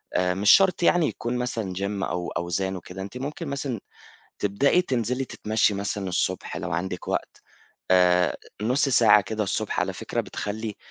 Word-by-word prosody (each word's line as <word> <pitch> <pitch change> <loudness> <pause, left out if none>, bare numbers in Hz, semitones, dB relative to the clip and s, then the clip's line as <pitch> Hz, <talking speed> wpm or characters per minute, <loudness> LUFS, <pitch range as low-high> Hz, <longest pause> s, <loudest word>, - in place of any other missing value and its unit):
آآ 90 0 +2
مش 100 +2 +4
شرط 190 -2 +5
يعني 170 -2 +4
يكون 120 +1 -3
مثلًا 115 -6 -2
Gym 100 +1 -2
أو 90 -1 -2
أوزان 95 +2 -2
وكده، 90 +1 -8
أنتِ 100 +6 -7
ممكن 145 +5 -5
مثلًا 135 -4 -3 0.6
تبدئي 135 - +2
تنزلي 125 - -1
تتمشي 110 -3 0
مثلًا 100 -1 -3
الصبح 90 +1 -2
لو 90 - -4
عندِك 90 +1 -3
وقت، - - -3 0.5
آآ 90 -1 +4 0.3
نُص 125 +5 +2
ساعة 110 -5 +6
كده 105 +2 -3
الصبح - - -2
على - - 0
فكرة - - -3
بتخلي 105 0 -5
105 Hz, 160 wpm, -25 LUFS, 95-125 Hz, 0.6 s, ساعة